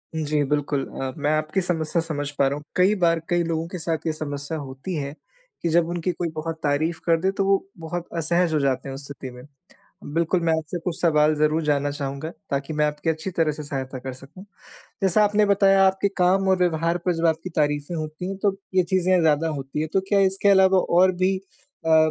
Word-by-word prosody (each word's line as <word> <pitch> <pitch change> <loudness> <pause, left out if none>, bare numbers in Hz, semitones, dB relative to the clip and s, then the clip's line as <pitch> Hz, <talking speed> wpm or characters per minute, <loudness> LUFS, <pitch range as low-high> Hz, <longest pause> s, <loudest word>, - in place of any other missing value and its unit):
जी 150 -1 0
बिल्कुल 145 -1 -1
अ, 135 -1 -5
मैं 145 +1 0
आपकी 155 +5 0
समस्या 170 -1 0
समझ 145 -3 -3
पा 135 - +4
रहा 140 - -1
हूँ। 150 - -10
कई 190 +3 +4
बार 165 -1 +4
कई 175 0 +2
लोगों 165 0 -2
के 180 - -6
साथ 160 0 -1
ये 155 - +1
समस्या 145 0 -5
होती 135 +6 -6
है 140 -1 -3 0.5
कि 170 - 0
जब 170 0 +3
उनकी 175 +1 -1
कोई 170 -1 -3
बहुत 160 +1 -3
तारीफ़ 155 +3 0
कर 165 -1 +3
दे 190 +1 +2
तो 195 - +1
वो 195 0 +4 0.2
बहुत 170 +2 -5
असहज 170 +1 +1
हो 155 - +2
जाते 135 0 0
हैं - - -5
उस 140 - -8
स्थिति 135 -2 -8
में। 125 0 -12 0.7
बिल्कुल, 170 +2 +1
मैं 165 -1 +2
आपसे 160 +3 -4
कुछ 175 -3 -3
सवाल 155 -2 +4
ज़रूर 155 +2 +2
जानना 145 -1 +1
चाहूँगा 140 +2 -4 0.2
ताकि 140 +2 -2
मैं 150 0 +2
आपकी 150 +2 -2
अच्छी 160 +4 -2
तरह 165 -3 +1
से 150 +1 -7
सहायता 135 -2 -5
कर 130 0 -6
सकूँ। 145 +9 -13 0.6
जैसा 195 +3 +4
आपने 210 0 +3
बताया 195 -1 +5
आपके 190 +1 +2
काम 190 +1 +3
और 190 - +4
व्यवहार 170 -1 +1
पर 180 - +3
जब 165 +1 +1
आपकी 165 +3 0
तारीफें 145 +2 0
होती 155 +3 -5
हैं, 195 - -4
तो 195 -1 0 0.2
ये 185 - +5
चीज़ें 185 +1 +2
ज़्यादा 160 0 +2
होती 140 0 -4
हैं। 155 - -1
तो 195 - +3
क्या 200 -1 +3
इसके 195 +1 +2
अलावा 190 -1 +6 0.2
और 185 0 +6
भी 190 +1 +3 0.5
अ, 160 -1 +5
160 Hz, 220 wpm, -24 LUFS, 150-180 Hz, 0.7 s, अलावा